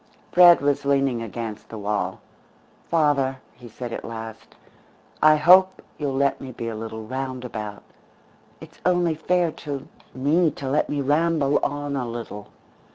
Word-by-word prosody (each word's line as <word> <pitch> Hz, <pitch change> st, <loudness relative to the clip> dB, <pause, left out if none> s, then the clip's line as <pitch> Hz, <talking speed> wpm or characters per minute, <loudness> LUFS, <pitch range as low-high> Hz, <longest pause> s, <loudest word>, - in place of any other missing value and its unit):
Fred 175 Hz, -3 st, +7 dB
was 140 Hz, 0 st, +1 dB
leaning 135 Hz, -4 st, +1 dB
against 115 Hz, -1 st, -6 dB
the 110 Hz, -, -7 dB
wall. 100 Hz, -3 st, -2 dB, 0.7 s
"Father," 145 Hz, -5 st, +2 dB, 0.2 s
he 120 Hz, -2 st, -13 dB
said 120 Hz, +1 st, -7 dB
at -, -, -5 dB
last, 115 Hz, -1 st, -8 dB, 0.7 s
"I 155 Hz, 0 st, +7 dB
hope 185 Hz, +5 st, +5 dB, 0.2 s
you'll 140 Hz, -3 st, -2 dB
let 140 Hz, 0 st, +1 dB
me 135 Hz, -1 st, -7 dB
be 115 Hz, -1 st, -6 dB
a 115 Hz, -, -5 dB
little 110 Hz, 0 st, -6 dB
roundabout. 125 Hz, -4 st, -5 dB, 0.8 s
It's -, -, -14 dB
only 175 Hz, -2 st, +2 dB
fair 170 Hz, +2 st, +1 dB
to 145 Hz, -1 st, -7 dB, 0.3 s
me 155 Hz, +6 st, +2 dB
to 140 Hz, -, -6 dB
let 140 Hz, +3 st, +1 dB
me 145 Hz, -1 st, -1 dB
ramble 150 Hz, 0 st, +2 dB
on 145 Hz, 0 st, -3 dB
a 125 Hz, -3 st, -3 dB
little. 115 Hz, -3 st, -7 dB
135 Hz, 150 wpm, -23 LUFS, 115-150 Hz, 0.8 s, Fred